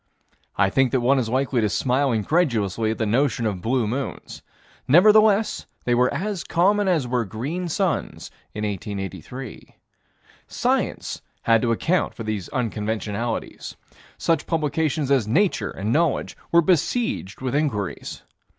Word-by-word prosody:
I 95 -1 +2
think 135 0 +2
that 130 - +3
one 135 +3 +3
is 115 -3 -2
likely 130 0 +1
to 105 - +1
smile 130 +5 +1
incredulously 110 - +1
at 110 - -2
the 110 - 0
notion 120 +1 +1
of 100 -4 -2
blue 120 +3 +1
moons. 130 +6 -5 0.5
Nevertheless 210 - +5 0.2
they 120 - +2
were 125 +1 +3
as 190 +5 -3
common 200 +4 +2
as 165 -8 +2
were 125 -1 0
green 135 - -4
suns 180 +2 -2 0.2
in 105 - -3
1883. 105 +5 -6 0.7
Science - - -1 0.2
had 115 -1 +4
to 120 - +1
account 170 +10 0
for 115 - -6
these 110 -4 -4
unconventionalities. 110 -1 -3 0.4
Such 165 - 0
publications 155 -2 0
as 130 -6 +3
Nature 180 - +1
and 105 +4 -3
Knowledge 165 -1 +1 0.2
were 170 0 +5
besieged 170 - 0
with 130 -1 -2
inquiries. 135 - -2
130 Hz, 140 wpm, -23 LUFS, 110-160 Hz, 0.7 s, Nevertheless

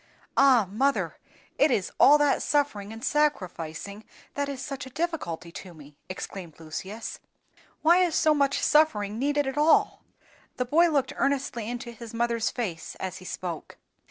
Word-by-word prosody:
"Ah! 260 -7 +5
mother, 265 +9 0 0.4
it 290 - +5
is 205 -8 0
all 295 - +8
that 290 -1 +2
suffering 245 -9 0
and 225 +1 -9
sacrificing 200 - -1 0.3
that 285 0 -2
is 275 -2 -5
such 275 0 -6
a - - -9
difficulty 260 - -3
to 180 0 -10
me!" 150 -1 -14
exclaimed 185 -3 -7
Lucius. 190 +8 -6 0.6
"Why 340 +3 +6
is 350 -3 +2
so 310 -1 +4
much 280 -1 +1
suffering 220 -9 +3
needed 290 +2 +1
at 270 +2 -2
all?" 310 +2 +3 0.6
The 250 - 0
boy 330 +7 +4
looked 280 -3 0
earnestly 270 -5 -1
into 240 0 -5
his 230 -1 -10
mother's 235 -1 0
face 180 -10 -5
as 190 -1 -5
he 185 - -13
spoke. 175 -2 -6
245 Hz, 155 wpm, -27 LUFS, 195-290 Hz, 0.6 s, all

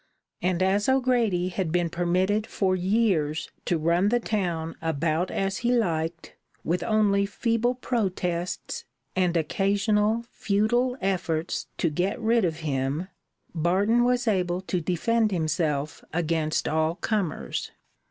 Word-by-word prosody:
And 180 0 +1
as 200 +4 +2
O'Grady 240 -9 +2
had 180 -3 -2
been 175 0 +2
permitted 185 +5 0
for 190 -2 +1
years 185 -6 +1
to 175 - +1
run 170 +5 +2
the 240 +2 +2
town 175 -8 -2
about 160 +2 0
as 195 0 -1
he 240 +1 +1
liked, 165 -7 -1 0.3
with 175 +1 0
only 205 -3 +2
feeble 230 +3 0
protests 185 - -2 0.3
and 180 -2 +2
occasional 210 +6 +1
futile 240 +5 +1
efforts 175 -4 -1
to 165 - +1
get 180 - -1
rid 230 -2 +3
of 165 -1 -2
him, 145 +4 -2 0.4
Barton 190 +8 +2
was 245 0 +1
able 180 -3 +1
to 185 -1 -2
defend 215 +7 +1
himself 155 -4 -1
against 160 -2 0
all 160 +1 +1
comers. 200 -5 -2
185 Hz, 125 wpm, -26 LUFS, 165-215 Hz, 0.4 s, rid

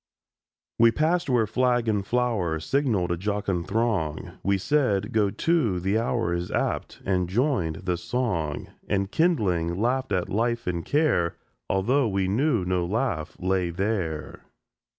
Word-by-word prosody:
WE 115 0 +7
passed 160 +6 +1
where 120 -3 +3
flag 120 +1 +1
and 105 -2 0
flower 110 -10 0
Signalled 105 - 0
a 85 - 0
jocund 100 -2 -2
throng; 95 -7 -1
We 100 0 +1
said: 105 -4 +1
"Go 105 -2 +2
to, 115 - +1
the 95 +5 +1
hour 115 -5 0
Is 85 +1 -2
apt!"—and 90 -2 -1
joined 110 - +1
the 90 -2 0
song; 85 - -2 0.2
And, 100 0 0
kindling, 95 - +1
laughed 130 +3 0
at 90 -3 0
life 115 +3 0
and 85 -2 -2
care, 145 - +1 0.3
Although 120 +8 +2
we 95 -2 0
knew 115 0 +1
no 90 -1 0
laugh 95 - -2
lay 95 -1 0
there. 85 -4 -3
100 Hz, 140 wpm, -26 LUFS, 90-120 Hz, 0.3 s, WE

